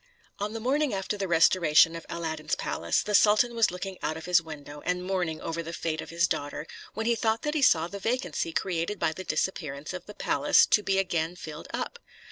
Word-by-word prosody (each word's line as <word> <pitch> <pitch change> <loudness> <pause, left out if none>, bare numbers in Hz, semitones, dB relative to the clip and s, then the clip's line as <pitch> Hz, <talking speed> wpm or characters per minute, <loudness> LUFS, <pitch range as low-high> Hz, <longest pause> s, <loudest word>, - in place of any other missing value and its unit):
On 205 +1 -3
the 225 - -4
morning 270 +1 +1
after 195 +2 -2
the 200 -1 -3
restoration 165 -1 +5
of 165 - -8
Aladdin's 160 -2 -2
palace, - - -1
the 210 - -3
sultan 215 +4 +5
was 230 -2 +3
looking 185 +1 -6
out 155 - -2
of 160 - -8
his 175 -1 +4
window, 150 -2 -9
and 180 0 -1
mourning 180 -4 -1
over 165 +1 -3
the 165 0 -7
fate 155 -2 -2
of - - -9
his 170 0 +2
daughter, 145 +1 -3 0.3
when 220 +2 -2
he 235 - +3
thought 225 0 0
that 300 -1 -1
he 305 - 0
saw 165 -10 +4
the 200 +3 -7
vacancy 190 - -1
created 170 +4 -1
by 160 - +1
the 185 - -7
disappearance 155 -3 -2
of 180 -1 -7
the 210 - -10
palace - - +4
to 210 - +3
be 195 -1 0
again 175 -3 0
filled 155 -2 -8
up. 475 - -4
180 Hz, 220 wpm, -28 LUFS, 160-210 Hz, 0.3 s, restoration